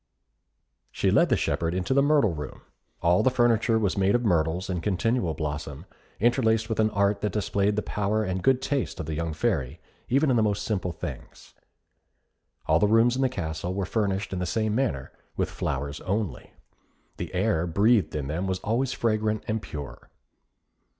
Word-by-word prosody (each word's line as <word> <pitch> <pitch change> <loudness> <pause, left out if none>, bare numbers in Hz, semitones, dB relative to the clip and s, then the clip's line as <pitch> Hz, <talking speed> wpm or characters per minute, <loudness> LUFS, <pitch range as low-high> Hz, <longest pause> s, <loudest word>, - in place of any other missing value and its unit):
She - - +1
led - - +4
the - - +3
shepherd 85 +1 -1
into 95 +7 0
the 140 - +4
Myrtle 140 - +3
Room. 75 -3 -7 0.4
All 85 +1 +4
the 130 - +4
furniture 115 -2 +2
was 100 -3 0
made 100 +2 +3
of 120 0 0
myrtles 85 -1 +1
in 90 -3 -2
continual 105 -2 0
blossom, 75 -2 -5 0.3
interlaced 110 -1 +2
with 110 - -2
an 110 0 +4
art 100 -1 +1
that 105 - -1
displayed 105 0 0
the 105 - -1
power 105 +1 -1
and 95 -2 -2
good 130 +3 +2
taste 140 -3 -2
of - - -3
the 80 - -4
young 85 +1 -2
Fairy, 75 -1 -1 0.3
even 135 +3 +3
in 120 - +3
the - - +4
most 105 -1 0
simple 95 -5 -1
things. 80 - -9 1.1
All 80 +1 +3
the 105 - +3
rooms 115 +3 +4
in 130 - -1
the 130 - +3
castle 85 -4 -4
were 100 -1 -1
furnished 100 -1 -1
in 95 - -2
the 90 - -2
same 110 +3 0
manner, 110 - -1 0.3
with - - -1
flowers 70 +3 -3
only. 95 - -3 0.7
The 85 -1 -5
air 90 -3 +1
breathed 105 +4 +2
in 75 -2 -2
them 80 +7 -2
was 95 -1 -1
always 120 +5 0
fragrant 110 -1 0
and 110 -1 -1
pure. 75 -7 -8
100 Hz, 185 wpm, -26 LUFS, 85-115 Hz, 1.1 s, led